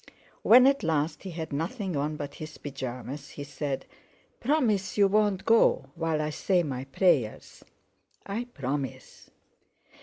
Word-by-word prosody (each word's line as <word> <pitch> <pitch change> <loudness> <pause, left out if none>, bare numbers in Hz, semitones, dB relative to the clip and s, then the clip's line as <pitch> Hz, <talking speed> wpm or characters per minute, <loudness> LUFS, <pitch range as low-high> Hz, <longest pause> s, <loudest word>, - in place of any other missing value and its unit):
When 250 +3 +8
at 275 +1 +4
last 160 -1 0
he 195 - -7
had 160 -3 -6
nothing 180 - -2
on 150 +2 -1
but 145 -1 -6
his 155 - -7
pyjamas, 135 0 -6
he 145 - -7
said: 140 -1 -4 0.5
"Promise 230 -9 +1
you 200 -1 +6
won't 205 -1 +1
go 230 0 +4
while 165 -2 -1
I 150 - -2
say 180 +3 +1
my 135 -4 -4
prayers!" 135 - 0 0.6
"I 220 +5 -3
promise." 140 - -5
160 Hz, 140 wpm, -28 LUFS, 140-200 Hz, 0.6 s, When